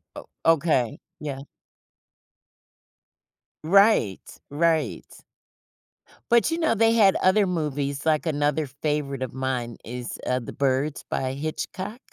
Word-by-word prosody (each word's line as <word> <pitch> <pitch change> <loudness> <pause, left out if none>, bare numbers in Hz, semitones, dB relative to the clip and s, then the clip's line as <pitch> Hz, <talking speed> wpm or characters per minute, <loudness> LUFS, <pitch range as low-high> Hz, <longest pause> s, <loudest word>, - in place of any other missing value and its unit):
Oh, - - -9 0.2
okay, 155 -7 +2 0.2
yeah. 140 -3 -5 2.2
Right, 195 - +4 0.3
right. 155 -3 0 1.3
But 235 +7 +4
you 330 - -1
know, 320 -7 +2
they 225 +1 +4
had 200 -4 +5
other 190 +1 +4
movies, 145 -4 -2
like 155 +1 +1
another 145 0 0
favorite 140 -1 -3
of 125 - -5
mine 130 -3 -3
is, 120 +1 -6
uh, 125 - +1
The 115 - -8
Birds 140 +2 0
by 130 0 -2
Hitchcock. 185 - -5
150 Hz, 115 wpm, -25 LUFS, 130-180 Hz, 2.2 s, had